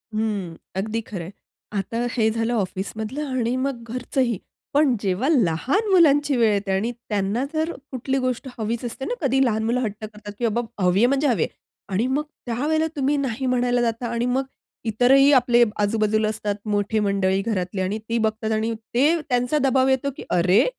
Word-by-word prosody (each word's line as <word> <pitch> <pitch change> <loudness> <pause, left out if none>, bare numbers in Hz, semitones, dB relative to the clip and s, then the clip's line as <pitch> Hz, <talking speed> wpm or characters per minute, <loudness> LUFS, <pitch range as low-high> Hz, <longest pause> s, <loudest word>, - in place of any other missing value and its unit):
हं, 205 -6 -2 0.2
अगदी 215 +4 -1
खरं 195 -6 -6
आहे. 175 - -8 0.5
आता 230 +5 -3
हे 220 -3 +2
झालं 225 +1 -1
ऑफिसमधलं 220 +6 -3
आणि 235 +1 0
मग 260 -2 -2
घरचंही. 250 -3 0 0.4
पण 285 -3 +4
जेव्हा 195 +6 0
लहान 265 - +2
मुलांची 290 -6 +5
वेळ 225 -2 +4
येते 200 -1 -1
आणि 195 +5 0
त्यांना 215 -1 -2
जर 315 +1 0 0.2
कुठली 265 +1 -1
गोष्ट 255 +1 -2
हवीच 225 +1 -2
असते 255 +3 -5
ना - - -2
कधी 270 -2 +3
लहान 220 -2 0
मुलं 235 +3 +1
हट्ट 215 -5 -1
करतात 210 -1 -8
की 235 - +2
बाबा 230 -2 -3
हवी 180 +2 +3
आहे 235 - +6
म्हणजे 275 +3 +2
हवी 225 - +2
आहे. - - -2 0.4
आणि 200 +6 +1
मग 280 +3 0 0.2
त्यावेळेला 300 +7 0
तुम्ही 280 0 +1
नाही 265 -2 -2
म्हणायला 245 -1 +2
जाता 235 0 -1
आणि 235 +1 -1
मग 255 +2 +1 0.4
इतरही 255 +6 +5
आपले 240 -2 +5 0.2
आजूबाजूला 215 +1 +2
असतात 210 -1 -2
मोठे 205 +1 0
मंडळी 195 -1 +1
घरातले 190 -3 -2
आणि 190 +3 -1
ती 230 - +1
बघतात 220 0 -1
आणि 220 +1 0 0.2
ते 295 +8 +3
त्यांचा 245 +3 +1
दबाव 265 0 +3
येतो 265 +1 +2
की - - -7
"अरे! 180 +4 +4
230 Hz, 180 wpm, -23 LUFS, 210-260 Hz, 0.5 s, आहे